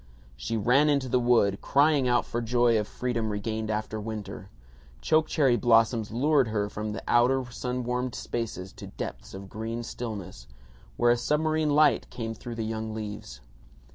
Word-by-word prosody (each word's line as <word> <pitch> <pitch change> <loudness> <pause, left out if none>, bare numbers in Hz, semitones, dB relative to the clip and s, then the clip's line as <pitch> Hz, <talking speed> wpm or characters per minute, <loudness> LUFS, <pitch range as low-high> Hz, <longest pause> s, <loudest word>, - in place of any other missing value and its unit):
She 60 - -3
ran 125 +8 +4
into 140 -3 +1
the 125 0 +2
wood, 115 -5 +2
crying 145 -1 +3
out 120 -1 +2
for 120 - -3
joy 120 -1 +3
of 105 - -3
freedom 120 -3 -2
regained 110 +1 -3
after 110 0 -3
winter. 105 -3 -7 0.5
Choke 155 - +2
cherry 135 -6 +3
blossoms 115 -2 +3
lured 135 +3 +2
her 105 -2 -1
from 105 +1 -4
the 105 - -6
outer 125 +2 +3
sun 125 +1 -3
warmed 125 0 -2
spaces 100 -5 -5
to - - -8
depths - - -7
of 95 0 -8
green 115 +3 -5
stillness, 100 - -7 0.5
where 120 - +4
a 120 - +3
submarine 155 +4 +1
light 150 -1 +3
came 115 -2 -5
through 115 +2 -8
the 115 -1 -3
young 110 0 -4
leaves. 105 - -7
115 Hz, 170 wpm, -27 LUFS, 110-125 Hz, 0.5 s, ran